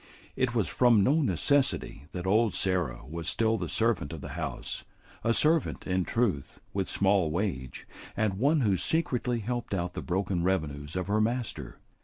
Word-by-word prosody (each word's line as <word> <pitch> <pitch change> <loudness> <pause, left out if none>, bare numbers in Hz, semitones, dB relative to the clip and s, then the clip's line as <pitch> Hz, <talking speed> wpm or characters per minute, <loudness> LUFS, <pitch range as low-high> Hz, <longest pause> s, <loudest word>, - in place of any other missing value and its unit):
It 130 -2 0
was 110 -5 +2
from 120 -5 +4
no 150 +10 +3
necessity 135 - 0
that 90 0 -5
old 110 +2 +3
Sarah 90 -11 0
was 80 +2 -3
still 110 -1 +2
the 85 -3 -3
servant 110 -11 +1
of 80 - -7
the - - -7
house; - - -5 0.4
a 115 - +2
servant, 155 +6 +3
in 90 -1 0
truth, 100 - -1
with 95 -2 -1
small 95 -4 +2
wage, 80 -7 -3 0.3
and 100 -3 0
one 145 +4 +3
who 100 -6 +2
secretly 125 - 0
helped 120 -1 -3
out 90 -1 -2
the - - -4
broken 95 0 -1
revenues 80 -5 -1
of 90 -1 -1
her 105 +3 +1
master. 120 +1 -2
100 Hz, 170 wpm, -29 LUFS, 90-120 Hz, 0.4 s, from